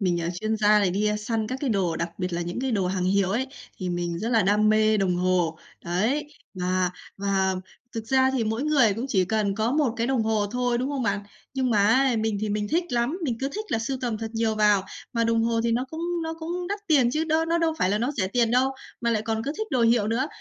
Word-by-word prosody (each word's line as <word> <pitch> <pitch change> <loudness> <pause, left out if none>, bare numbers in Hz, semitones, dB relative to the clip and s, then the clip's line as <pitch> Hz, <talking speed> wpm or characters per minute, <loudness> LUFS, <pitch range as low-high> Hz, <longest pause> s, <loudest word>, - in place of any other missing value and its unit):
Mình, 175 -3 +1
à, 165 - -2
chuyên 220 0 0
gia 210 0 +5
này 195 -3 +2
đi 205 +3 +1
săn 220 0 -2
các 255 +4 -4
cái 275 -5 0
đồ, 185 -6 0
đặc 170 +1 -2
biệt 180 -1 -2
là 170 - -1
những 175 +7 -4
cái 265 - -1
đồ 200 -6 +1
hàng 185 0 -1
hiệu 190 0 +2
ấy, 240 +6 0 0.3
thì 185 - -3
mình 175 -1 -2
rất 225 - -2
là 225 -3 +3
đam 210 +2 +3
mê 215 0 +4
đồng 185 -3 +1
hồ. 180 -3 +1 0.3
Đấy! 220 +13 0 0.3
Và 185 0 0 0.3
và 195 -1 +1 0.4
thực 225 -2 -5
ra 260 +2 +3
thì 255 -4 0
mỗi 220 +4 -1
người 270 -9 +4
cũng 235 +4 -3
chỉ 190 -6 +2
cần 205 0 0
có 220 +4 0
một 285 -5 +2
cái 230 0 0
đồng 260 -3 +1
hồ 220 -2 +1
thôi, 245 +2 0
đúng 255 - -1
không 280 -3 -2
bạn? 200 -2 0 0.3
Nhưng 260 -2 0
mà 205 -3 +4
ấy, 260 +2 +3
mình 220 -2 0
thì 215 - -1
mình 210 0 -1
thích 335 +7 +1
lắm, 245 +8 0
mình 245 -6 -1
cứ 270 - 0
thích 430 - -4
là - - 0
sưu 235 +4 -2
tầm 235 -4 -2
thật 225 0 -5
nhiều 225 -1 +1
vào, 210 -2 +3 0.3
mà 230 -1 +1
đồng 230 0 +2
hồ 230 0 +1
thì 230 - +2
nó 245 +2 +1
cũng 320 - -6 0.2
nó 320 0 -3
cũng 350 +2 -4
đắt 405 +1 -2
tiền 275 -7 +4
chứ 310 +5 0
đó 320 0 +1
nó 335 +1 +1
đâu 330 -1 +1
phải 185 - +2
là 205 - +1
nó 240 +5 0
rẻ 205 -9 -1
tiền 230 +2 +2
đâu, 255 +2 +3 0.3
mà 235 - +1
lại 215 -2 +1
còn 220 0 -2
cứ 285 - -2
thích 435 - -2
đồ 250 - +2
hiệu 230 -2 +3
nữa. 240 +5 0
225 Hz, 270 wpm, -25 LUFS, 200-255 Hz, 0.4 s, gia